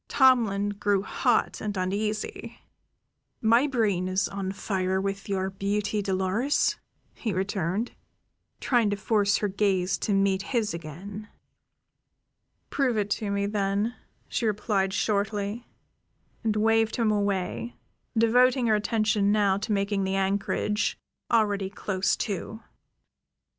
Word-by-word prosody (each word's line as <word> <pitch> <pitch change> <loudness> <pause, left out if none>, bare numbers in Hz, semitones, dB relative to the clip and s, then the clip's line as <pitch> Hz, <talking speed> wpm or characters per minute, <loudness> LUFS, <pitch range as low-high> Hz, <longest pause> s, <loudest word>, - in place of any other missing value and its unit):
Tomlin 230 -7 +3
grew 205 -1 0
hot 245 +1 0
and 205 -2 -3
uneasy. 210 +3 -3 0.8
"My 230 +5 +4
brain 210 -9 +1
is 185 +2 +1
on 195 -1 -4
fire 190 -1 -1
with 195 +1 -3
your 190 -1 -1
beauty, 205 +2 -1
Dolores," 195 +8 +1 0.4
he 225 - -3
returned, 190 +3 -1 0.7
trying 240 -5 +2
to 205 - 0
force 205 0 +2
her 210 - 0
gaze 190 -2 +1
to 205 - 0
meet 195 -1 +2
his 215 -2 -1
again. 185 +6 -8 1.4
"Prove 260 -5 +1
it 205 -1 -1
to 210 -1 -1
me, 200 0 0
then," 200 +2 0 0.3
she 230 - -1
replied 205 -2 0
shortly, 205 +2 -1 0.8
and 220 -2 +1
waved 225 +1 +2
him 225 -3 +2
away, 205 +2 -1 0.4
devoting 245 +3 +4
her 220 -2 +4
attention 210 -1 +1
now 200 -2 +3
to 215 +2 -4
making 200 -1 0
the 190 0 -1
anchorage, 200 +2 0 0.3
already 205 -4 +2
close 195 -1 -1
to. 215 +1 -4
205 Hz, 120 wpm, -27 LUFS, 195-220 Hz, 1.4 s, My